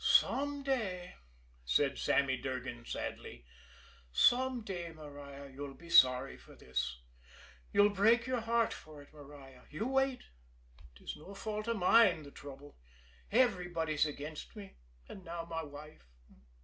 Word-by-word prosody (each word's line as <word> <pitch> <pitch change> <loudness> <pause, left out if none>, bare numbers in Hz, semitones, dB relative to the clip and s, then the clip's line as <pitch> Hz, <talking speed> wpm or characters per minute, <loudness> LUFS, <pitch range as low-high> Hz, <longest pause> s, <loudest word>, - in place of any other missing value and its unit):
"Some 285 0 +3
day," 200 -10 -2 0.5
said 135 - +1
Sammy 140 -1 +2
Durgan 125 -2 -5
sadly, - - -6 0.7
"some 250 - +4
day, 175 -5 -5
Maria, 145 -2 -10
you'll 140 0 -7
be 170 0 -13
sorry 130 -1 +6
for - - -16
this. 65 -1 -3 0.7
You'll 205 0 +5
break 225 +4 +4
your 255 -1 0
heart 230 0 +1
for 150 -2 -11
it, 145 - -22
Maria! 140 -3 -13
You 155 +9 -3
wait! 270 0 +1 0.7
'Tis - - -7
no 190 +6 -11
fault 215 +1 -4
of 230 -1 0
mine, 185 -3 +5
the 140 - -11
trouble. 140 - -11 0.5
Everybody's 175 - +2
against 150 +4 -7
me 200 -2 -10 0.3
and 190 - -10
now 170 -1 -5
my 165 -1 -3
wife. 145 - -12
165 Hz, 135 wpm, -34 LUFS, 140-215 Hz, 0.7 s, sorry